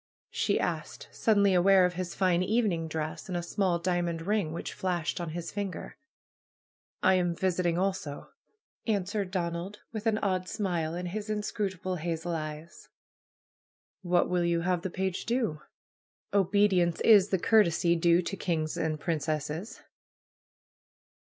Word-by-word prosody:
she - - +1
asked, - - -3
suddenly 200 -4 +3
aware 185 +1 +6
of 180 - 0
his 180 0 -4
fine 180 -2 +2
evening 185 -5 +1
dress 160 +4 -4
and 180 - -1
a 175 - -3
small 180 0 0
diamond 170 -1 -1
ring 200 -4 0
which 165 - -5
fiashed 180 -3 -2
on 170 - -4
his 170 +1 -5
finger. 200 -2 -5 1.1
am 180 -2 +3
visiting 175 -2 0
also," 190 -6 -2 0.6
answered 200 -2 -1
Donald, 180 +2 -3
with 220 0 -3
an 220 -1 +2
odd 185 -3 -1
smile 175 -6 -2
in 180 +1 -4
his 205 +4 -4
inscrutable 195 -3 -2
hazel 165 +1 -3
eyes. 155 +1 -6 1.1
'^What 175 -1 +2
will 180 -1 +1
you 170 -1 +1
have 180 0 0
the 190 - -3
page 190 +1 -3
do? 230 -11 0 0.7
^Obedience 195 -3 +3
is 205 -3 +6
the 190 - +2
courtesy 170 -4 +3
due 170 +1 +3
to 195 - -3
kings' 160 -5 -2
and 155 -1 -1
princesses 155 +3 -3
180 Hz, 140 wpm, -29 LUFS, 170-195 Hz, 1.1 s, aware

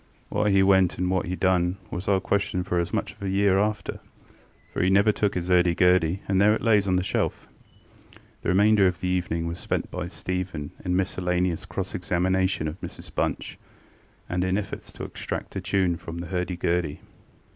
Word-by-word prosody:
Why 105 - +1
he 95 -1 +5
went 95 -2 +4
and 90 0 0
what 95 -1 0
he 90 - -2
done 90 0 +1
was 90 +2 -5
our 100 -1 +3
question 95 -1 0
for 90 -1 0
as 85 - -2
much - - -2
as - - -24
a 100 - -2
year 95 0 +3
after; 105 +1 -1 0.7
for - - -3
he 90 - +3
never 100 +3 +5
took 105 -1 0
his 90 0 -2
ŌĆÖurdy 90 -1 +4
gurdy, 90 0 +3
and 95 -1 +2
there 105 +1 +5
it - - -5
lays 105 -4 +4
on 95 - +2
the 90 - +1
shelf. - - -2
ŌĆØ - - -26
The - - -2
remainder 100 +1 +5
of 90 -1 -1
the 90 - -2
evening 85 -2 -1
was 85 +1 -4
spent - - -2
by 85 - -4
Stephen 90 -5 -4
in 90 0 0
miscellaneous 90 -1 0
cross 90 +1 -4
examination 90 -1 0
of 75 +4 -6
Mrs - - -9
Bunch - - -2 0.7
and 90 0 -1
in 95 +1 +1
efforts 100 -1 -5
to - - -8
extract - - -5
a - - -2
tune 90 -3 +1
from 85 0 -8
the 85 - -5
hurdy 90 -1 -2
gurdy. 85 -4 -1
90 Hz, 200 wpm, -25 LUFS, 90-95 Hz, 0.7 s, he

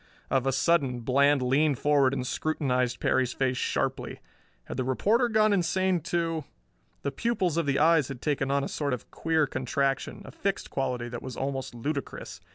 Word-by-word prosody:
Of 135 0 +2
a - - +3
sudden 135 -3 +2
Bland 140 +3 +3
leaned 140 +2 +2
forward 140 -2 +3
and 130 -2 -2
scrutinized 130 -4 0
Perry's 130 -1 +1
face 130 -1 0
sharply. - - -2 0.4
Had - - -7
the 130 - 0
reporter 215 - +2
gone 215 -1 +4
insane 185 0 +1
too? 165 -1 -1 0.6
The 140 - -1
pupils 190 - 0
of 165 -3 0
the 140 -1 +2
eyes 160 -2 +4
had 135 -3 -7
taken 135 -1 -1
on 140 0 +1
a - - -2
sort 145 -3 -2
of 125 - -6
queer 160 -1 +1
contraction, 135 - -2
a - - -9
fixed 200 -1 -3
quality 125 -3 -2
that 120 -1 -6
was 125 - -7
almost 135 -2 -3
ludicrous. 140 +4 -5
140 Hz, 175 wpm, -28 LUFS, 130-165 Hz, 0.6 s, gone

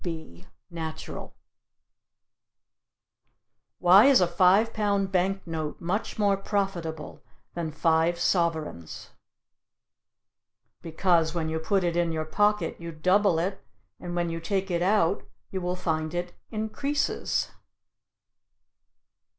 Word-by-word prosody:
B 160 - -7 0.2
natural. 160 -2 -7 2.4
Why 185 +5 +7
is 275 -2 +6
a 180 - +4
five 185 +6 +3
pound 200 -2 0
bank 195 +1 0
note 160 -3 -4
much 185 +6 -3
more 200 -2 +2
profitable 185 -7 -3 0.3
than 165 -2 -3
five 165 +2 +2
sovereigns? 160 - -1 1.7
Because 165 0 +1
when 160 -2 -1
you 160 0 -2
put 190 +4 0
it 170 -1 0
in 170 -1 +1
your 155 -1 -2
pocket 210 +5 +1
you 170 0 -6
double 185 +3 +2
it, 190 +4 -2 0.4
and 175 0 -6
when 175 -1 -1
you 165 - -4
take 195 +2 -2
it 170 -1 0
out 190 -1 +2 0.3
you 190 - -3
will 180 0 -1
find 160 -2 -2
it 175 0 -3 0.2
increases. 275 +7 -1
175 Hz, 115 wpm, -27 LUFS, 165-195 Hz, 2.4 s, Why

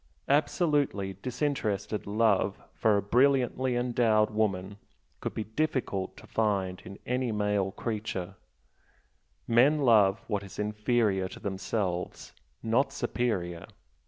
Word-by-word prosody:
Absolutely 145 - +1
disinterested 125 -6 -2
love 105 -2 +2
for 105 -2 +2
a 100 - -1
brilliantly 130 +2 +2
endowed 115 -3 +2
woman 100 -2 -1 0.5
would - - -3
be 110 - -2
difficult 110 -5 -2
to - - -13
find 100 -4 -1
in 100 +2 -9
any 125 -1 -1
male 105 -2 0
nature, 105 -5 -3 1.1
men 130 +6 +5
love 105 -6 +5
what 105 -3 -1
is 100 -1 -11
inferior 105 -2 +1
to - - -10
themselves, 95 -2 -3 0.3
not 125 +5 +2
superior. 95 -11 -2
110 Hz, 110 wpm, -29 LUFS, 100-125 Hz, 1.1 s, men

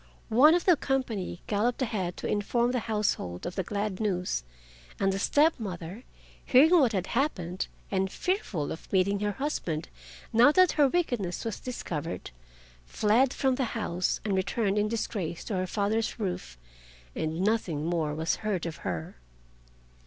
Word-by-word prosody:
One 285 +9 +7
of 355 - 0
the 360 - +6
company 245 - -2
galloped 230 +5 0
ahead 190 -7 -2
to - - -4
inform 235 +4 +1
the 250 - 0
household 200 - -1
of 175 - -3
the 190 - -1
glad 200 0 -3
news, 180 - -1 0.6
and 195 0 +2
the 195 - -2
step 300 +7 +3
mother 185 +2 -6 0.4
hearing 275 +6 +6
what 260 -6 +4
had 190 -2 0
happened, 190 - -1 0.2
and 190 -1 0
fearful 220 - -2
of 160 - -8
meeting 195 +1 +2
her 205 0 -1
husband 185 - -3 0.4
now 240 +5 +7
that 370 +1 +6
her 290 -3 +4
wickedness 245 - -1
was 225 - -3
discovered, 170 - -5 0.6
fled 230 - +3
from 265 -1 +1
the 260 0 0
house 180 -4 -1
and 205 - 0
returned 200 +2 0
in 210 - +2
disgrace 205 -6 -3
to 210 - -3
her 185 0 -1
father's 215 +5 -1
roof, 180 - -4 0.6
and 160 +1 -2
nothing 190 -8 0
more 160 -3 0
was 160 +2 0
heard 205 -6 -2
of 165 -2 -4
her. 80 -7 -5
205 Hz, 160 wpm, -28 LUFS, 175-245 Hz, 0.6 s, One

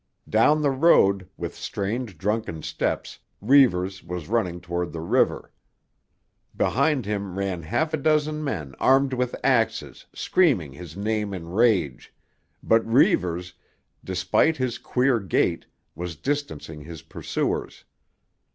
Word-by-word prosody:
Down 150 +8 +3
the 140 - +3
road, 100 - +4
with - - -5
strange, 105 -1 -4
drunken 100 -4 -2
steps, - - -3 0.2
Reivers 100 -7 +3
was 90 -2 -6
running 95 -7 0
toward 85 0 -4
the 80 - -5
river. 80 - +1 1.1
Behind 140 -1 +1
him 100 -2 -3
ran 95 -3 -2
half 120 - -1
a - - +2
dozen 155 +1 +1
men 80 - -4
armed 135 0 +3
with 125 -1 -1
axes - - 0
screaming 120 - +2
his 85 +2 -10
name 105 -1 -1
in 85 -2 -8
rage, 95 - +1 0.5
but 115 0 +3
Reivers, 90 - +2 0.5
despite 95 - +1
his 130 -2 -2
queer 125 -1 +1
gait, 95 -4 0 0.3
was 85 0 -6
distancing 80 - -4
his 80 0 -10
pursuers. 80 - -3
100 Hz, 125 wpm, -24 LUFS, 90-130 Hz, 1.1 s, road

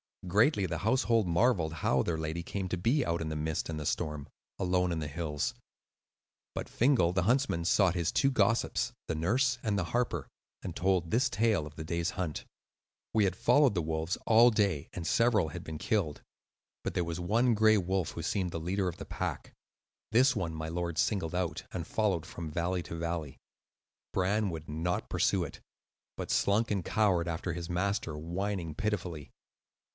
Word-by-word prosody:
Greatly 105 - +3
the 85 -2 -3
household 115 -2 +2
marvelled 85 -3 +2
how 65 -4 +1
their 80 +4 -1
lady 80 +1 -3
came 95 +2 -3
to 90 - -1
be 120 - +2
out 85 0 -1
in 80 - -2
the 80 - -3
mist 75 +1 -2
and 80 -1 -3
the 75 - -5
storm, 75 -1 -2 0.3
alone 90 -1 +1
on 85 - -1
the 75 - -3
hills; 75 -1 -2 1.0
but - - -4
Fingal, 120 -9 +3
the 95 -1 +1
huntsman, 120 -6 +1
sought 90 0 +3
his 85 -3 0
two 135 - +3
gossips, 120 -3 +1
the 80 - -1
nurse 125 - +2
and 105 -3 0
the 95 - +1
harper, 85 - -1 0.4
and 85 - -5
told 90 -2 +1
this 125 +6 +2
tale 105 -7 +1
of 75 - -13
the 80 - -6
day's 85 +1 -1
hunt. 90 -5 -4 0.7
"We 110 -2 +4
had 90 -2 0
followed 125 +2 +4
the 85 - +1
wolves 80 +2 -2
all 115 +2 +7
day, 100 -9 +1
and 85 - -5
several 110 -7 +3
had - - -7
been 80 -1 -6
killed. 90 -7 -1 0.6
But - - -2
there 90 - +1
was 85 0 -4
one 115 +7 +2
gray 110 0 +5
wolf, 95 -2 0
who 85 - -6
seemed 90 +1 -1
the 85 - -3
leader 95 +4 -1
of 90 -1 -4
the - - -7
pack. - - -4 0.6
This 130 +4 +5
one 85 -6 -2
my 80 0 -4
lord 85 -1 -3
singled 90 -5 0
out, 90 -2 -2
and 85 -4 -4
followed 95 -7 0
from 80 0 -6
valley 85 +3 -1
to 85 - -7
valley. 85 -3 -3 0.8
Bran 100 +3 +1
would 80 -2 -6
not 80 +4 -2
pursue - - +2
it, - - -8 0.5
but - - -4
slunk 105 +3 +2
and 100 -4 -1
cowered 95 -6 +2
after 85 +1 -2
his 85 +1 -5
master, 90 -3 -1
whining 85 +1 -3
pitifully. 90 -6 -3
90 Hz, 185 wpm, -31 LUFS, 80-105 Hz, 1.0 s, all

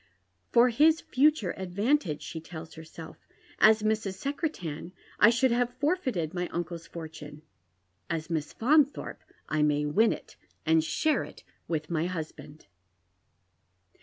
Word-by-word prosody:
" 90 0 -46
For 240 +1 +5
liis 310 +7 +4
future 275 - +2
advantage," 190 - 0
she 160 - -6
tells 165 0 -9
herself; 160 0 -10 0.3
" - - -26
as 215 -1 +3
Mrs. 215 -3 0
Secretan 190 - -4 0.3
I 210 - +8
should 250 +2 +3
have 245 +1 0
forfeited 255 - -1
my 175 -1 -2
uncle's 170 -1 -5
fortune 155 -3 -9 0.3
— - - -47 0.3
as 165 -2 -2
Miss 155 -4 -2
Faunthorpe 290 +4 +2 0.3
I 155 -1 0
may 150 0 +2
win 215 +10 +3
it - - -8 0.3
and 160 0 +4
share 295 - +1
it - - -12 0.2
with 155 -1 -3
my 165 +1 0
husband." 155 -3 -7
175 Hz, 140 wpm, -28 LUFS, 160-245 Hz, 0.3 s, I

